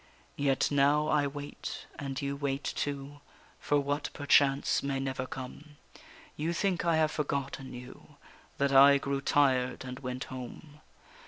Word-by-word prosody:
Yet 140 -1 +1
now 145 +2 +3
I 145 -2 +3
wait, 145 +1 -7
and 135 -2 -4
you 140 -1 -2
wait 140 0 -2
too, 145 0 -4 0.4
For 145 - +2
what 145 +1 -2
perchance 140 -1 +3
may 140 -1 -2
never 130 -1 -3
come; 145 +4 -9 0.6
You 165 +3 -1
think 185 -1 0
I 170 -2 +3
have 155 -1 +2
forgotten 135 -2 -3
you, 125 +4 -12 0.4
That 140 0 +1
I 140 +1 +8
grew 140 0 -2
tired 130 -3 +2
and 125 0 -6
went 125 -1 -4
home. 140 +4 -9
140 Hz, 145 wpm, -30 LUFS, 135-145 Hz, 0.6 s, I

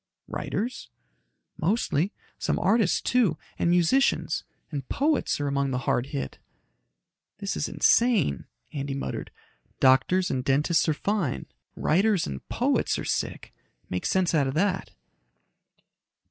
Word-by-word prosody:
"Writers?" 235 +5 -4 0.7
"Mostly. 185 -1 +1 0.3
Some - - 0
artists, 210 -2 +2
too, 225 -11 +2 0.2
and - - +2
musicians. 175 +10 +2 0.3
And 140 -4 -5
poets 295 - +1
are 145 - -1
among 140 0 0
the 130 - -1
hard 125 - +1
hit." 70 - -5 1.0
"This 200 -1 -3
is 150 - -2
insane," 220 - +3 0.3
Andy 140 -2 -3
muttered. 140 - -4 0.5
"Doctors 135 +9 +4
and 130 -1 -1
dentists 150 +5 +2
are 155 - +2
fine 180 - -1 0.3
writers 195 +2 +2
and 65 -1 -5
poets - - +1
are - - -4
sick. - - -3 0.4
Make 90 0 -1
sense 185 -2 +1
out 145 -4 +3
of 135 - -3
that." 190 +2 0
165 Hz, 125 wpm, -26 LUFS, 135-200 Hz, 1.0 s, Doctors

